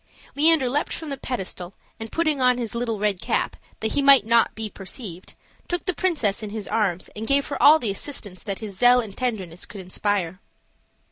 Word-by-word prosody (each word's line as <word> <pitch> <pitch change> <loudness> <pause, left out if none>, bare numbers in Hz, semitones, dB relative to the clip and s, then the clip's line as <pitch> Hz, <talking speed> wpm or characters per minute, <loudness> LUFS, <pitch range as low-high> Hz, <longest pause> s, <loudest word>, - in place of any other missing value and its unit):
Leander 305 -2 +4
leaped 285 +4 -1
from 320 - -5
the 275 - -2
pedestal, 190 -8 -5 0.2
and 225 0 -7
putting 310 -4 0
on 250 -1 +4
his 235 -2 -4
little 235 -2 -2
red 205 -2 0
cap, - - -1 0.3
that 220 - -1
he 285 - +1
might 275 -5 +7
not 230 0 +3
be 220 0 -3
perceived, 195 -2 -7 0.3
took 350 0 -3
the 370 - 0
princess 285 - 0
in 215 - -5
his 210 -1 -6
arms 195 -5 -1
and 220 +1 -5
gave 280 0 +3
her 280 - -4
all 305 +2 +8
the 235 -9 -1
assistance 200 -4 -5
that 200 -3 -4
his 210 -3 -7
zeal 245 +4 +6
and 215 -5 -5
tenderness 195 -9 -3
could 210 - -9
inspire. 185 -1 -2
225 Hz, 200 wpm, -24 LUFS, 200-275 Hz, 0.3 s, all